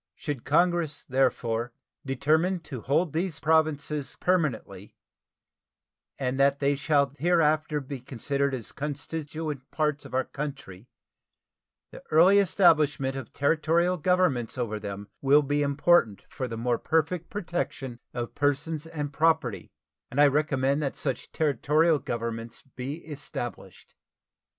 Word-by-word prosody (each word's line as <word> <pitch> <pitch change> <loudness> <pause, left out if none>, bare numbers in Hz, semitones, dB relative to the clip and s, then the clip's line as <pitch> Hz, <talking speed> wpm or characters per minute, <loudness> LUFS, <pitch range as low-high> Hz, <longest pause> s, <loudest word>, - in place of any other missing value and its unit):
Should 145 -6 -5
Congress, 170 -1 +1
therefore, 120 -3 0 0.3
determine 155 +7 +1
to 135 -7 -7
hold 150 +6 +1
these 165 0 -2
Provinces 150 -3 +1
permanently, 135 - -1 1.2
and 130 0 -2
that 140 0 +4
they 140 0 +1
shall 140 -1 +1
hereafter 155 -2 +2
be 135 -1 -7
considered 140 +3 -2
as 120 -4 -6
constituent 150 0 -5
parts 150 -2 -1
of - - -8
our 130 - +2
country, 135 -9 -7 1.0
the - - -11
early 180 +6 +6
establishment 155 -8 +3
of 135 - -7
Territorial 165 +5 +2
governments 175 -9 +1
over 110 -4 -2
them 100 -1 -6
will 145 +2 +5
be 145 +1 0
important 140 - +3
for 130 - -4
the 115 -1 -5
more 120 0 0
perfect 160 +2 0
protection 160 - -4
of 120 -1 -5
persons 145 +2 -1
and 150 -3 -5
property; 160 -7 +1 0.4
and 135 - -3
I 145 - +8
recommend 140 -1 +1
that 140 -2 -3
such 135 -4 -4
Territorial 155 +2 +2
governments 115 -1 -5
be 135 +5 -7
established. 120 - -7
145 Hz, 125 wpm, -27 LUFS, 130-160 Hz, 1.2 s, I